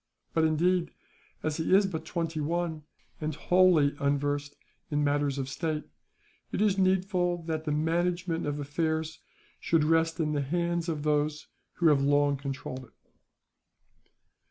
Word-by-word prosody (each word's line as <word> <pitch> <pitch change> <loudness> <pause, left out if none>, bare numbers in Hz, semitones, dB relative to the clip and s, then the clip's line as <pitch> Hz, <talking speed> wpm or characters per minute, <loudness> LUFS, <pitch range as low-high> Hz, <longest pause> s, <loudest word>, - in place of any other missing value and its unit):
But 160 -1 +3
indeed, 170 +2 +2 0.5
as 155 -1 -1
he 165 +3 +3
is 200 +1 +5
but 165 -4 -4
twenty 165 -2 -2
one, 165 +1 -2 0.4
and 155 -1 -3
wholly 175 -4 +4
unversed 145 0 -1 0.3
in 150 0 0
matters 145 -1 +1
of 135 -1 -2
state, 155 +2 -2 0.7
it - - -2
is 205 -2 +3
needful 185 -2 +1
that 160 -1 -3
the 150 - -1
management 170 +2 0
of 145 0 -2
affairs 160 +2 -2 0.4
should 165 -2 +2
rest 165 +1 +2
in 155 -2 0
the 145 - 0
hands 170 +3 -1
of 150 -3 -3
those 150 0 0 0.3
who 170 -2 +3
have 145 -2 +4
long 145 0 +3
controlled 135 -1 -6
it. - - -29
160 Hz, 145 wpm, -29 LUFS, 145-170 Hz, 0.7 s, is